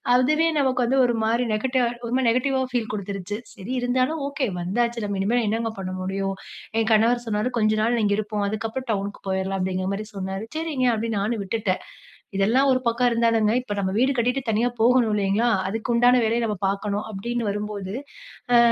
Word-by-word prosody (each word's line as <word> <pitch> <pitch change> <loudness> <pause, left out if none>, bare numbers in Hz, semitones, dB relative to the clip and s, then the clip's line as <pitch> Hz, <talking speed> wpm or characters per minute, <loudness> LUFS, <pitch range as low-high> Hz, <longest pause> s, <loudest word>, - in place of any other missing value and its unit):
அதுவே 305 +6 +3
நமக்கு 260 -2 +2
வந்து 260 +3 +1
ஒருமாரி 230 0 +1
நெகட்ட 260 +4 0 0.3
ஒருமாரி 250 +1 +1
நெகட்டிவா 260 +3 +1
ஃபீல் 235 -3 -1
குடுத்துருச்சு. 200 -1 -4 0.2
சரி 215 +2 -8
இருந்தாலும் 255 +5 0
ஓகே 280 -1 -1 0.2
வந்தாச்சு. 235 +6 0
நம்ம 200 -1 -2
இனிமே 235 +5 +2
என்னங்க 225 +1 -1
பண்ண 185 -1 -4
முடியும்? 195 +1 -2 0.4
என் 225 0 +1
கணவர் 235 +3 +3
சொன்னாரு, 215 +3 0
"கொஞ்ச 215 -1 +3
நாள் 235 +1 +2
இங்க 205 - +2
இருப்போம். 210 -1 -2
அதுக்கப்பறம் 225 +4 -4
டவுனுக்கு 200 -1 -3
போயிர்லாம்" 190 0 -1
அப்பிடீங்குற 185 0 -1
மாரி 215 +2 -5
சொன்னாரு. 190 +1 -4
"சரிங்க", 315 -5 -1
அப்பிடீன்னு 225 -1 -1
நானும் 220 +1 -1
விட்டுட்டேன். 200 -1 -1 0.6
இதெல்லாம் 235 +8 +3
ஒரு 255 0 +3
பக்கம் 235 +1 +3
இருந்தாலுங்க, 230 -2 +2
இப்ப 210 -5 -5
நம்ம 190 -1 0
வீடு 260 +3 +3
கட்டிட்டு 250 +3 +1
தனியா 225 +3 +2
போகணும் 240 -2 +4
இல்லீங்களா? 205 +3 +2 0.2
அதுக்கு 225 +3 -3
உண்டான 245 +1 +5
வேலைய 230 +2 +1
நாம 210 -3 -1
பாக்கணும் 200 +1 -1
அப்பிடீன்னு 230 +3 -3
வரும்போது 205 -2 -4 0.6
அ - - +8
225 Hz, 175 wpm, -24 LUFS, 205-245 Hz, 0.6 s, அ